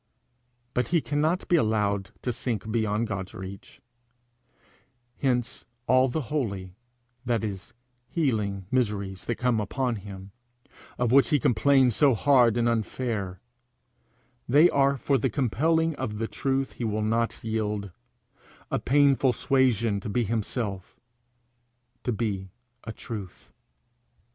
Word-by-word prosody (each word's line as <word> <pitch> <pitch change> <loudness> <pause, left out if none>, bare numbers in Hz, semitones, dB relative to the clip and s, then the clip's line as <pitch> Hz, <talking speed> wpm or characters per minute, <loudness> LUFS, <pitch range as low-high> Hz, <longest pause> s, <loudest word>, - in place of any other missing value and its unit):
But 125 -2 0
he 170 0 +2
cannot 155 +4 0
be 175 - +4
allowed 105 - +1
to 125 - -1
sink 110 -3 -3
beyond 110 0 0
God's 95 -4 -5
reach; 95 +1 -9 1.4
hence 125 -1 -1 0.2
all 130 +2 +4
the 145 +5 -2
holy 100 -10 -2 0.5
that 120 -3 0
is, 100 -2 -6 0.3
healing 105 - -1
miseries 100 -6 -1
that 120 - -1
come 125 -2 +1
upon 120 +3 -1
him, 100 -1 -10 0.7
of 120 -2 +1
which 135 -2 +5
he 150 - +3
complains 130 +1 +4
as - - -4
so 140 -5 +5
hard 120 -2 +4
and 120 0 +2
unfair: 110 -5 -2 1.1
they 150 +7 +6
are 140 0 +3
for 135 +1 +1
the 130 - +1
compelling 160 +7 +1
of 105 -1 -3
the 115 +1 -2
truth 135 +1 -1
he - - -7
will 110 -1 -1
not 115 +2 -1
yield 105 -3 -2 0.8
a - - +1
painful 140 -1 +3
suasion 120 -7 +2
to 100 - -6
be 120 +4 +1
himself, 105 -3 -3 1.0
to 125 - 0
be 100 -4 -2 0.4
a 110 - -4
truth. 105 -4 -8
115 Hz, 130 wpm, -27 LUFS, 105-130 Hz, 1.4 s, they